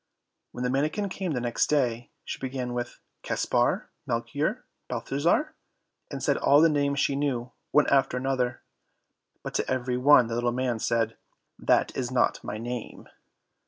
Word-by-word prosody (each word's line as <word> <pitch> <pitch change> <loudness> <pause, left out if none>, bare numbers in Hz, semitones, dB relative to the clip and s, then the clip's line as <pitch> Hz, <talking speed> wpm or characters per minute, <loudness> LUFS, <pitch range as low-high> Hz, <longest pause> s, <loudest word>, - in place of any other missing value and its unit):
When 125 - -5
the 125 - 0
manikin 155 +9 0
came 185 -3 -3
the 125 - -1
next 120 -1 0
day, 120 -5 +1 0.2
she - - -5
began 130 -2 -3
with 120 0 -4 0.2
Caspar, - - 0 0.2
Melchior, - - -2 0.2
Balthazar, 170 - 0 0.6
and - - -6
said - - +2
all 140 +1 +5
the 165 +1 +6
names 140 -2 +1
she 140 - +1
knew, 130 -4 -1 0.2
one 150 - +4
after 135 -2 +3
another; 125 -1 -1 0.8
but - - -5
to - - -1
every 125 -1 -1
one 130 -1 +6
the 115 - -5
little 120 +1 +1
man 125 -2 -1
said, 115 0 0 0.4
"That - - +2
is 125 -2 -2
not 125 -1 +1
my - - -4
name." 120 +1 -6
130 Hz, 160 wpm, -27 LUFS, 120-140 Hz, 0.8 s, the